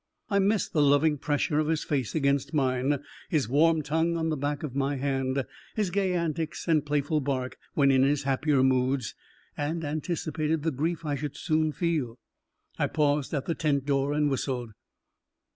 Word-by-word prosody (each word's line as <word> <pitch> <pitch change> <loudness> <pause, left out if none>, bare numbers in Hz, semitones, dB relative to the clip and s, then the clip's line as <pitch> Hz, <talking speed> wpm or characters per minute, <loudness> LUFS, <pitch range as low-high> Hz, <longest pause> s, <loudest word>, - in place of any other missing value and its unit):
I 200 - +3
missed 200 0 +1
the 150 - +3
loving 145 +1 +4
pressure 145 +1 0
of 155 - +1
his 160 -1 0
face 135 -6 -2
against 140 0 +1
mine, 135 +1 +1 0.3
his 150 -8 +1
warm 155 +5 +3
tongue 160 +3 0
on 160 0 0
the 155 - 0
back 145 +1 -2
of 135 -4 -5
my 140 +1 0
hand, 135 -1 -1 0.3
his 210 -4 0
gay 190 -1 +1
antics 165 -1 -2
and 155 -3 +3
playful 150 +1 0
bark 130 -2 -2 0.2
when 140 -2 +4
in 130 -1 +4
his 140 +1 +2
happier 140 0 +2
moods, 130 -1 +1 0.4
and 160 +3 -2
anticipated 155 0 -2
the 160 - +1
grief 160 +4 -2
I 150 - -1
should 145 +1 -4
soon 155 -2 +1
feel. 150 -8 -1 0.6
I - - +2
paused 145 -2 +1
at 140 - -2
the 165 - 0
tent 145 -4 0
door 140 0 +1
and 150 0 +2
whistled. 130 -4 -2
145 Hz, 175 wpm, -28 LUFS, 135-160 Hz, 0.6 s, loving